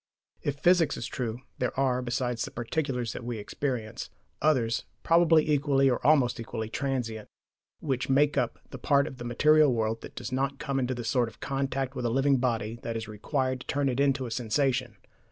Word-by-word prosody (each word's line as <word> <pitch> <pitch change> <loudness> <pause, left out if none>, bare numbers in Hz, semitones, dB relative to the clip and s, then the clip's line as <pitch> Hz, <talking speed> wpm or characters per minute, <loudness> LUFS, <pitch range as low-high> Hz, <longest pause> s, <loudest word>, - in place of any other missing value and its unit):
If 145 -1 -2
physics 170 -2 +3
is - - -4
true, 120 -2 -4 0.2
there 125 +1 -1
are, 130 -2 +2
besides 125 -1 -1
the - - -4
particulars 125 -1 -2
that - - -7
we 120 -1 -4
experience, 110 +1 -4 0.3
others, 125 -7 +2 0.2
probably 165 -2 +5
equally 140 -2 +3
(or 125 - -2
almost 135 -4 +4
equally) 110 -1 -4
transient, 120 -5 -3 0.5
which 135 -4 -2
make 145 +2 +3
up - - 0
that - - -6
part 140 0 +3
of 135 - -7
the 120 - -6
material 150 +4 +4
world 115 -1 -1
that - - -10
does - - -6
not 135 +2 -1
come 140 -2 -2
into 130 0 -1
the 120 - -5
sort 120 0 +1
of 110 - -20
contact 135 -1 -2
with 125 -2 -4
a - - +2
living 135 +3 +3
body 115 -2 -1
that 115 -1 -3
is 110 - -5
required 130 +4 -2
to - - -12
turn 140 -1 +1
it 125 +1 -2
into 135 -2 +2
a 120 - -6
sensation. 125 +2 0
130 Hz, 195 wpm, -28 LUFS, 120-140 Hz, 0.5 s, probably